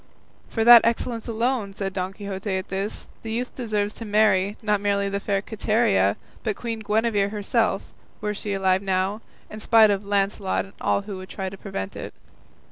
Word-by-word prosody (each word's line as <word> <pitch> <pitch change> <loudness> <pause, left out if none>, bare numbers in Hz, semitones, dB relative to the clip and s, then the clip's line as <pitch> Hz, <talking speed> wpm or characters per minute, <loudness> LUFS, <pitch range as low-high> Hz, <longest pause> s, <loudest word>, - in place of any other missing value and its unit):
"For 225 - 0
that 235 0 +10
excellence 230 0 -1
alone," 230 -3 -1
said 195 -1 -3
Don 185 0 -2
Quixote 200 -1 -4
at 190 - -6
this, 195 +3 -2 0.2
"the 225 - -6
youth 245 +2 -3
deserves 210 -4 -2
to - - -7
marry, 205 -2 +2
not 210 -2 +1
merely 200 -1 +1
the 200 0 -2
fair 200 0 -1
Quiteria, 210 - +2 0.2
but 215 -3 -1
Queen 230 -2 -4
Guinevere 215 -1 +1
herself, 205 -1 0 0.4
were 210 0 -2
she 205 0 -3
alive 190 -1 +2
now, 190 +2 0 0.3
in 215 - -9
spite 220 -1 +5
of 200 0 -1
Launcelot 200 -1 0
and 195 - -16
all - - +1
who 200 -1 -6
would 185 0 -9
try 190 -1 -4
to 195 - -9
prevent 100 - -5
it." - - -7
205 Hz, 185 wpm, -24 LUFS, 195-220 Hz, 0.4 s, that